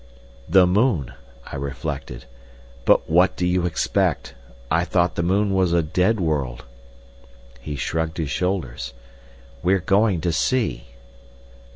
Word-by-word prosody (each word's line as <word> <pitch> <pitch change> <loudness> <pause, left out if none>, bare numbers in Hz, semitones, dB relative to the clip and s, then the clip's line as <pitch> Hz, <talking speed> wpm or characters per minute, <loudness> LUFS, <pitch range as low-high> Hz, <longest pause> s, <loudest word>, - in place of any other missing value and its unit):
"The 90 +1 +6
moon," 90 - +1 0.3
I - - -7
reflected. 70 -2 -5 0.6
"But - - +4
what 90 +4 +3
do 90 - -1
you 90 0 +1
expect? 80 -4 0 0.4
I 85 +3 +3
thought 85 -1 +1
the 85 - -2
moon 100 +3 +1
was 95 -3 +2
a 85 -1 +3
dead 90 +8 +1
world." 70 -8 -2 0.9
He 75 +4 -6
shrugged 80 +2 -2
his 80 -4 -2
shoulders. 70 -6 -2 0.7
"We're 95 +3 +3
going 100 0 +2
to 85 +1 0
see." 80 - 0
85 Hz, 130 wpm, -22 LUFS, 70-95 Hz, 0.9 s, The